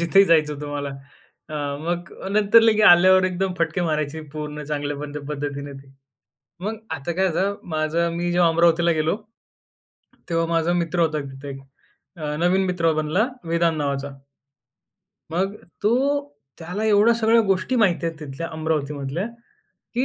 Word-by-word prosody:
जिथे 195 Hz, +4 st, +5 dB
जायचं 155 Hz, -4 st, +3 dB
होतं 145 Hz, 0 st, -7 dB
मला. 145 Hz, -1 st, -3 dB, 0.9 s
मग 170 Hz, +1 st, -3 dB, 0.2 s
नंतर 210 Hz, +2 st, +5 dB
लगेच 220 Hz, -1 st, +4 dB
आल्यावर 185 Hz, +1 st, +7 dB
एकदम 185 Hz, 0 st, -1 dB
फटके 170 Hz, +1 st, 0 dB
मारायची 155 Hz, -1 st, -1 dB
पूर्ण 150 Hz, -1 st, -5 dB
चांगल्या 145 Hz, 0 st, -4 dB
पद्धतीने 145 Hz, -1 st, -4 dB
ते. 135 Hz, 0 st, -13 dB, 0.7 s
मग 220 Hz, +1 st, -3 dB
आता 145 Hz, +2 st, -3 dB
काय 190 Hz, +3 st, +1 dB
होतं 195 Hz, +4 st, 0 dB, 0.2 s
माझं? 160 Hz, +2 st, 0 dB
मी 175 Hz, +1 st, -1 dB
जेव्हा 175 Hz, -1 st, +4 dB
अमरावतीला 170 Hz, +1 st, +3 dB
गेलो, 155 Hz, +2 st, +1 dB, 1.1 s
तेव्हा 165 Hz, -1 st, +1 dB
माझा 165 Hz, +1 st, +1 dB
मित्र 175 Hz, 0 st, -1 dB
होता 160 Hz, -2 st, +2 dB
तिथे 135 Hz, +1 st, -9 dB
एक 135 Hz, 0 st, -7 dB, 0.8 s
नवीन 185 Hz, +3 st, +2 dB
मित्र 170 Hz, -3 st, +1 dB
बनला 155 Hz, +9 st, +1 dB, 0.2 s
वेदान 165 Hz, -1 st, +1 dB
नावाचा. 140 Hz, -1 st, -2 dB, 1.2 s
मग 190 Hz, +5 st, -1 dB, 0.3 s
तो, 260 Hz, -, +1 dB, 0.3 s
त्याला 180 Hz, +6 st, -4 dB
एवढ्या 215 Hz, +2 st, +5 dB
सगळ्या 230 Hz, 0 st, +4 dB
गोष्टी 195 Hz, +5 st, 0 dB
माहिती 180 Hz, -6 st, +2 dB
आहेत 165 Hz, -1 st, -4 dB
तिथल्या 150 Hz, +3 st, -6 dB
अमरावती 155 Hz, -2 st, -1 dB
मधल्या 140 Hz, +8 st, -3 dB, 0.7 s
की 250 Hz, +3 st, +1 dB
170 Hz, 140 wpm, -23 LUFS, 150-190 Hz, 1.2 s, आल्यावर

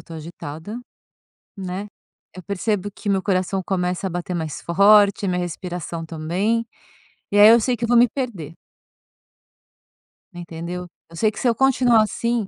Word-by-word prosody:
estou 165 Hz, -, -10 dB
agitada, 160 Hz, +5 st, -8 dB, 0.8 s
né. 190 Hz, +1 st, -5 dB, 0.5 s
Eu 185 Hz, -, -8 dB
percebo 200 Hz, 0 st, -2 dB
que 205 Hz, -, -7 dB
meu 195 Hz, -1 st, +2 dB
coração 190 Hz, 0 st, 0 dB
começa 180 Hz, 0 st, -1 dB
a 190 Hz, -, -2 dB
bater 175 Hz, +1 st, -4 dB
mais 160 Hz, -3 st, -4 dB
forte, 200 Hz, +3 st, +4 dB
minha 180 Hz, -1 st, 0 dB
respiração 175 Hz, -1 st, -5 dB
também. 180 Hz, +9 st, -1 dB, 0.7 s
E 205 Hz, -, +1 dB
aí 210 Hz, +1 st, +10 dB
eu 235 Hz, +1 st, +7 dB
sei 250 Hz, +2 st, 0 dB
que 235 Hz, -, -7 dB
eu -, -, +1 dB
vou 240 Hz, 0 st, +4 dB
me 240 Hz, +1 st, +6 dB
perder. 220 Hz, -, -5 dB, 1.8 s
Entendeu. 175 Hz, +1 st, -6 dB, 0.2 s
Eu 165 Hz, -, -13 dB
sei 215 Hz, +6 st, +2 dB
que -, -, -9 dB
se 250 Hz, -, 0 dB
eu 235 Hz, -, +4 dB
continuar, 250 Hz, -3 st, +4 dB
assim, 230 Hz, 0 st, -1 dB
190 Hz, 160 wpm, -22 LUFS, 175-220 Hz, 1.8 s, aí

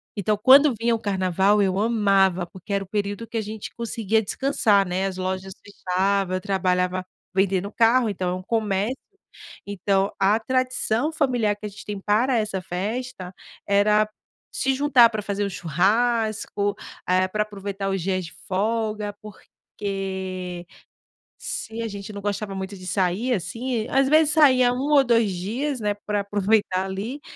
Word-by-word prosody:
então 205 Hz, +1 st, 0 dB
quando 275 Hz, +2 st, +7 dB
vinha 230 Hz, 0 st, +2 dB
o -, -, -5 dB
carnaval, 195 Hz, +1 st, +2 dB
eu 190 Hz, -1 st, +1 dB
amava, 195 Hz, -5 st, +2 dB
porque 190 Hz, +3 st, -12 dB
era 200 Hz, -1 st, 0 dB
o -, -, -24 dB
período 205 Hz, +2 st, -3 dB
que -, -, -11 dB
a -, -, +1 dB
gente 215 Hz, 0 st, -7 dB
conseguia 225 Hz, -2 st, 0 dB
descansar, 205 Hz, -5 st, +2 dB
né, 185 Hz, +2 st, -1 dB
as 190 Hz, -1 st, -3 dB
lojas 185 Hz, +1 st, -3 dB
fechavam, 195 Hz, -1 st, -1 dB
eu -, -, -6 dB
trabalhava 185 Hz, -2 st, 0 dB, 0.3 s
vendendo 195 Hz, 0 st, +1 dB
carro, 235 Hz, +1 st, +4 dB
então 185 Hz, -2 st, -2 dB
é -, -, -1 dB
um 185 Hz, -, -7 dB
comércio. 215 Hz, +2 st, 0 dB, 0.7 s
Então, 200 Hz, 0 st, 0 dB
a 205 Hz, +3 st, +3 dB
tradição 255 Hz, +2 st, 0 dB
familiar 245 Hz, -9 st, +1 dB
que 210 Hz, -, -9 dB
a -, -, -3 dB
gente 200 Hz, -, -12 dB
tem 205 Hz, -1 st, -5 dB
para 235 Hz, +5 st, +2 dB
essa 205 Hz, -4 st, -2 dB
festa, 195 Hz, +1 st, -4 dB, 0.3 s
era 210 Hz, +1 st, +3 dB, 0.4 s
se 270 Hz, 0 st, 0 dB
juntar 260 Hz, -4 st, +5 dB
pra 215 Hz, -1 st, -3 dB
fazer 205 Hz, 0 st, -2 dB
um -, -, -2 dB
churrasco, 205 Hz, +4 st, 0 dB, 0.3 s
eh, 185 Hz, +1 st, +3 dB
pra 210 Hz, +2 st, 0 dB
aproveitar 200 Hz, -1 st, -5 dB
os 195 Hz, -2 st, -1 dB
dias 185 Hz, 0 st, -1 dB
de 160 Hz, -, -10 dB
folga, 210 Hz, +1 st, -1 dB
porque 190 Hz, -3 st, -6 dB, 0.7 s
se 225 Hz, +1 st, -5 dB
a 225 Hz, -, -2 dB
gente 200 Hz, +1 st, -7 dB
não 200 Hz, -, -6 dB
gostava 205 Hz, 0 st, -3 dB
muito 190 Hz, +1 st, -5 dB
de 185 Hz, -, -11 dB
sair, 195 Hz, +7 st, 0 dB
assim 225 Hz, +5 st, -3 dB
às 270 Hz, 0 st, +2 dB
vezes 310 Hz, -1 st, +4 dB
saía 255 Hz, -5 st, +5 dB
1 275 Hz, +4 st, -2 dB
ou 285 Hz, -2 st, +7 dB
2 230 Hz, -4 st, +2 dB
dias, 240 Hz, +10 st, -3 dB
né, 205 Hz, -1 st, 0 dB
pra 210 Hz, -1 st, 0 dB
aproveitar 200 Hz, -1 st, +1 dB
ali, 210 Hz, +9 st, -5 dB
205 Hz, 160 wpm, -24 LUFS, 190-230 Hz, 0.7 s, quando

